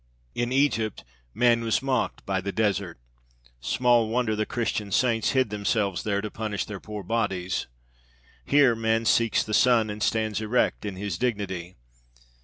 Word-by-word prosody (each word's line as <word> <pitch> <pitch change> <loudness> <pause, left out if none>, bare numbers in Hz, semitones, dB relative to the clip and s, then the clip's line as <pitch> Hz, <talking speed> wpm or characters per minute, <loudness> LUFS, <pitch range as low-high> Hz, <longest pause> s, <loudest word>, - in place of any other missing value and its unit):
In 120 0 -2
Egypt 130 -6 +1 0.3
man 120 0 +3
was 115 +3 0
mocked 135 -1 -1
by 95 -1 -1
the 100 +1 -3
desert. 100 -5 -1 0.6
Small 120 - +2
wonder 115 -2 0
the 110 0 -2
Christian 110 -3 -2
saints 115 +1 +2
hid 130 -5 +2
themselves 100 -2 0
there 100 -1 -1
to 105 -1 -5
punish 105 -4 -3
their 100 -2 -7
poor 105 0 -7
bodies! 95 -4 -1 0.8
Here 140 - +4
man 115 0 0
seeks 115 0 +3
the 110 - -6
sun 115 -2 +4
and 105 +1 -7
stands 110 -1 0
erect 110 0 0
in 100 -2 -4
his 95 -2 -4
dignity. 95 -7 -3
110 Hz, 155 wpm, -26 LUFS, 100-115 Hz, 0.8 s, Here